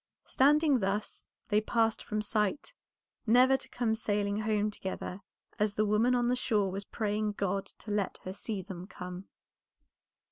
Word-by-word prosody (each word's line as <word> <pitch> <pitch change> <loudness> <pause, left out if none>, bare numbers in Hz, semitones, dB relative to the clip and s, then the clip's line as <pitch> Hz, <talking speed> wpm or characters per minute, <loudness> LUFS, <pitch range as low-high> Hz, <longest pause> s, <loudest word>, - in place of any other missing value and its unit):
Standing 290 0 +4
thus 200 +1 -2 0.2
they 210 0 +3
passed 225 0 +1
from 215 0 -2
sight, 215 - -1 0.5
never 250 +4 +6
to - - -5
come 240 -3 0
sailing 205 -2 0
home 215 -1 +1
together 190 -1 -5 0.4
as 210 -1 +1
the 215 - +2
woman 220 +4 +3
on 240 -1 +2
the 250 - +2
shore 210 -6 +1
was 195 +1 -5
praying 210 -1 -1
God 200 0 -1
to 215 - -10
let 205 -2 -1
her 185 - -5
see 205 -1 -4
them 185 -1 -8
come. 180 +1 -8
210 Hz, 155 wpm, -31 LUFS, 200-230 Hz, 0.5 s, never